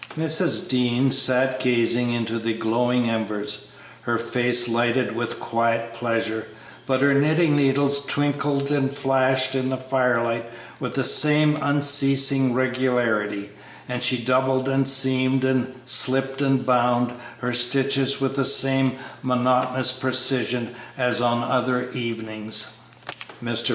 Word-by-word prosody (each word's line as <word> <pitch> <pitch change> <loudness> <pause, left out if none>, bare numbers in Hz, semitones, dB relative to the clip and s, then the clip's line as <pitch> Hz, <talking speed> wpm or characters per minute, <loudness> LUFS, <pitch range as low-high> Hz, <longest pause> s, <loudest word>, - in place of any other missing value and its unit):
Mrs. 160 +2 +1
Dean 125 +1 +1
sat 130 0 +1
gazing 120 0 0
into 115 -1 -3
the 115 0 -3
glowing 120 +2 0
embers, 105 -2 -4 0.3
her 120 0 -2
face 120 +1 0
lighted 120 +1 0
with 120 0 -4
quiet 115 0 -2
pleasure, 115 -1 -3 0.4
but 130 -1 0
her 140 0 +3
knitting 155 +2 +2
needles 140 0 +1
twinkled 145 0 -1
and 140 -2 0
flashed 130 -1 +1
in 130 -1 -2
the 130 - -2
firelight 125 -3 -1 0.3
with 125 - -5
the 135 - 0
same 150 +2 +4
unceasing 140 -2 +3
regularity, 120 -6 -1 0.4
and 125 0 -4
she 125 - +1
doubled 130 +2 0
and 135 0 +1
seamed 130 -1 +3
and 130 -1 -1
"slipped 135 +1 +1
and 135 -2 0
bound" 125 -1 +1 0.2
her 125 -1 -4
stitches 135 +2 +1
with 135 0 -2
the 140 - 0
same 135 0 +4 0.2
monotonous 125 0 +1
precision 130 -2 +1 0.2
as 125 -2 0
on 120 -1 0
other 125 0 -1
evenings. 110 -3 -4 0.6
Mr. 120 0 -1
130 Hz, 125 wpm, -22 LUFS, 120-135 Hz, 0.6 s, same